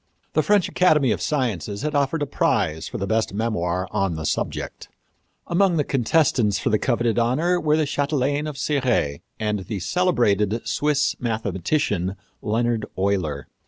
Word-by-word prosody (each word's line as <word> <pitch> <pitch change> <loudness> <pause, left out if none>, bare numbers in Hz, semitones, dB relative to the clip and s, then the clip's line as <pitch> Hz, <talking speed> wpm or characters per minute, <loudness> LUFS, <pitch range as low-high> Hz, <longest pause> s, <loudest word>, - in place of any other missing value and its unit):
The 155 - +3
French 200 +4 +3
Academy 150 -9 +3
of - - -1
Sciences 110 - -2
had 150 0 -1
offered 145 +2 +1
a - - 0
prize 80 - 0
for - - -5
the 100 - -2
best 110 0 0
memoir 95 -5 -1
on 95 -5 0
the 80 0 -5
subject. - - -3 0.6
Among 175 0 +2
the 150 - +2
contestants 125 -6 +2
for - - -1
the 110 - +3
coveted 120 -2 +1
honor 155 +10 +2
were 150 0 +2
the 155 - +2
chatelaine 145 0 0
of 150 -2 -6
Cirey 130 - 0 0.2
and 105 -1 -1
the 100 +2 -5
celebrated 115 - +1
Swiss 150 0 +1
mathematician, 100 - -1 0.3
Leonard 115 +1 0
Euler. 90 -8 -1
120 Hz, 155 wpm, -23 LUFS, 100-150 Hz, 0.6 s, The